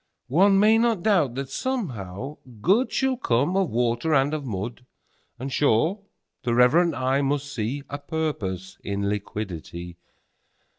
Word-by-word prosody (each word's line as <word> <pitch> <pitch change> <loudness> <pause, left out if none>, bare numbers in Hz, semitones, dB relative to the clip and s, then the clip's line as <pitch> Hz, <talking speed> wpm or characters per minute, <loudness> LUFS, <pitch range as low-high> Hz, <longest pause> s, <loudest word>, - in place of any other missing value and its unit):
9One 195 +6 +5
may 215 +3 +5
not 230 -6 +1
doubt 170 - +2
that, 135 0 -4
somehow, 135 - -4 0.2
Good10Shall 255 - +2
come 140 +10 +1
of 195 -4 +2
Water 120 +6 +1
and 135 +2 +3
of 155 -2 -2
Mud;11And, 120 +4 -8
sure, 150 - +2 0.4
the 120 -1 0
reverent 160 +8 +4
eye 130 +2 +1
must 145 0 -1
see12A 140 +5 -4
Purpose 95 - -3
in 100 0 -2
Liquidity. 90 -4 -5
135 Hz, 120 wpm, -25 LUFS, 110-170 Hz, 0.4 s, 9One